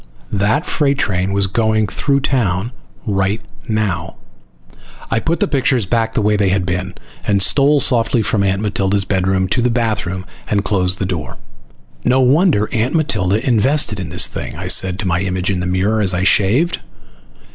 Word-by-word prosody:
That 105 Hz, -, +1 dB
freight 140 Hz, -5 st, 0 dB
train 95 Hz, -4 st, -1 dB
was 100 Hz, 0 st, +2 dB
going 110 Hz, +2 st, +1 dB
through 140 Hz, +8 st, -1 dB
town 115 Hz, -5 st, -1 dB, 0.3 s
right 100 Hz, 0 st, 0 dB, 0.3 s
now. 105 Hz, -7 st, -2 dB, 1.0 s
I 110 Hz, -, +2 dB
put 165 Hz, +7 st, -1 dB
the -, -, +1 dB
pictures 130 Hz, -5 st, +1 dB
back 115 Hz, +2 st, -1 dB
the 105 Hz, -, 0 dB
way 105 Hz, 0 st, +2 dB
they 100 Hz, -2 st, +1 dB
had 95 Hz, -1 st, 0 dB
been, 90 Hz, 0 st, -3 dB, 0.3 s
and 100 Hz, -1 st, +2 dB
stole 140 Hz, +8 st, +4 dB
softly 120 Hz, -3 st, +2 dB
from 105 Hz, -1 st, +1 dB
Aunt 95 Hz, +1 st, 0 dB
Matilda's 100 Hz, -1 st, 0 dB
bedroom 95 Hz, 0 st, 0 dB
to 120 Hz, -, +1 dB
the 125 Hz, -, +2 dB
bathroom, 110 Hz, -6 st, -2 dB, 0.2 s
and 100 Hz, -1 st, 0 dB
closed 95 Hz, -2 st, +1 dB
the 95 Hz, -, -2 dB
door. 85 Hz, -8 st, -5 dB, 0.7 s
"No 130 Hz, -, +2 dB
wonder 135 Hz, -, +3 dB
Aunt 120 Hz, +6 st, 0 dB
Matilda 110 Hz, -, 0 dB
invested 120 Hz, -1 st, +1 dB
in 90 Hz, -4 st, -5 dB
this -, -, +2 dB
thing!" -, -, -6 dB
I -, -, -6 dB
said 95 Hz, -1 st, +3 dB
to 100 Hz, -2 st, -3 dB
my 85 Hz, 0 st, 0 dB
image 95 Hz, 0 st, -1 dB
in 95 Hz, -, -2 dB
the 90 Hz, -, -3 dB
mirror 95 Hz, +4 st, 0 dB
as 95 Hz, -3 st, +3 dB
I 90 Hz, -, -1 dB
shaved. 110 Hz, -, +2 dB
105 Hz, 180 wpm, -17 LUFS, 95-120 Hz, 1.0 s, stole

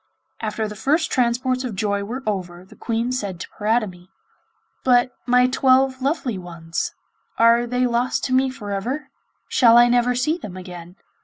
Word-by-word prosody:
After 220 Hz, 0 st, -2 dB
the 210 Hz, -, -8 dB
first 305 Hz, -, 0 dB
transports 255 Hz, +1 st, +1 dB
of 240 Hz, -5 st, -4 dB
joy 200 Hz, 0 st, -1 dB
were 245 Hz, +6 st, -6 dB
over 180 Hz, -4 st, -4 dB
the -, -, -17 dB
Queen 230 Hz, +1 st, -2 dB
said 200 Hz, -8 st, -3 dB
to -, -, -6 dB
Paridamie: 205 Hz, -5 st, -1 dB, 0.7 s
'But 250 Hz, -1 st, +3 dB, 0.2 s
my 250 Hz, 0 st, +5 dB
twelve 260 Hz, 0 st, +3 dB
lovely 265 Hz, -, -1 dB
ones, 165 Hz, -2 st, -5 dB, 0.4 s
are 235 Hz, +1 st, +4 dB
they 250 Hz, +1 st, 0 dB
lost 245 Hz, +1 st, 0 dB
to 255 Hz, -, -1 dB
me 260 Hz, +1 st, +3 dB
for 210 Hz, -6 st, -7 dB
ever? 260 Hz, +9 st, -3 dB, 0.4 s
Shall 235 Hz, -2 st, +5 dB
I 240 Hz, 0 st, +7 dB
never 245 Hz, 0 st, +2 dB
see 305 Hz, +7 st, 0 dB
them 185 Hz, -, -8 dB
again? 180 Hz, -1 st, -10 dB
235 Hz, 165 wpm, -22 LUFS, 200-255 Hz, 0.7 s, I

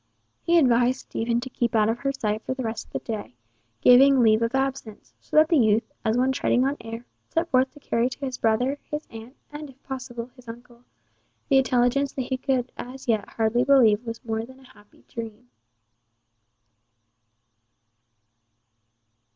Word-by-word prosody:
He 340 Hz, 0 st, +3 dB
advised 250 Hz, -3 st, +3 dB
Stephen 235 Hz, +1 st, -2 dB
to 260 Hz, -, -7 dB
keep 235 Hz, -2 st, -1 dB
out 215 Hz, -1 st, +4 dB
of 225 Hz, +2 st, -1 dB
her 275 Hz, +1 st, -1 dB
sight 215 Hz, -5 st, -2 dB
for 260 Hz, -, -4 dB
the 260 Hz, -, -4 dB
rest 225 Hz, 0 st, -4 dB
of -, -, -26 dB
the -, -, -1 dB
day, 210 Hz, -, -6 dB, 0.5 s
giving 270 Hz, +2 st, +6 dB
leave 220 Hz, -2 st, +4 dB
of 230 Hz, +3 st, 0 dB
absence, 265 Hz, -5 st, -3 dB
so -, -, -9 dB
that 310 Hz, +1 st, +6 dB
the 330 Hz, -, +4 dB
youth, 220 Hz, -1 st, +2 dB
as 220 Hz, +1 st, +1 dB
one 260 Hz, +1 st, +2 dB
treading 255 Hz, -1 st, +1 dB
on 275 Hz, +1 st, 0 dB
air, 230 Hz, +1 st, -8 dB, 0.2 s
set 335 Hz, +1 st, -1 dB
forth 260 Hz, 0 st, +3 dB
to -, -, -13 dB
carry 235 Hz, -3 st, 0 dB
to 275 Hz, +2 st, -6 dB
his 255 Hz, -1 st, -5 dB
brother, 250 Hz, +6 st, +1 dB
his 300 Hz, +1 st, -4 dB
aunt, 225 Hz, +3 st, -11 dB, 0.2 s
and 295 Hz, 0 st, -7 dB
if 270 Hz, 0 st, -19 dB
possible, 250 Hz, -2 st, -7 dB
his 250 Hz, -2 st, -18 dB
uncle, 240 Hz, +1 st, -12 dB, 0.7 s
the 270 Hz, -2 st, +5 dB
intelligence 260 Hz, +2 st, +1 dB
that 260 Hz, -, -3 dB
he 260 Hz, +1 st, -3 dB
could 255 Hz, -1 st, -1 dB
as 260 Hz, +2 st, -9 dB
yet 220 Hz, -4 st, 0 dB
hardly 225 Hz, +2 st, +1 dB
believe 245 Hz, -5 st, +4 dB
was 230 Hz, +1 st, -7 dB
more 220 Hz, -1 st, -2 dB
than 260 Hz, +3 st, -13 dB
a 260 Hz, -, -18 dB
happy 205 Hz, 0 st, -23 dB
dream. 220 Hz, -, -8 dB
245 Hz, 175 wpm, -24 LUFS, 230-265 Hz, 0.7 s, giving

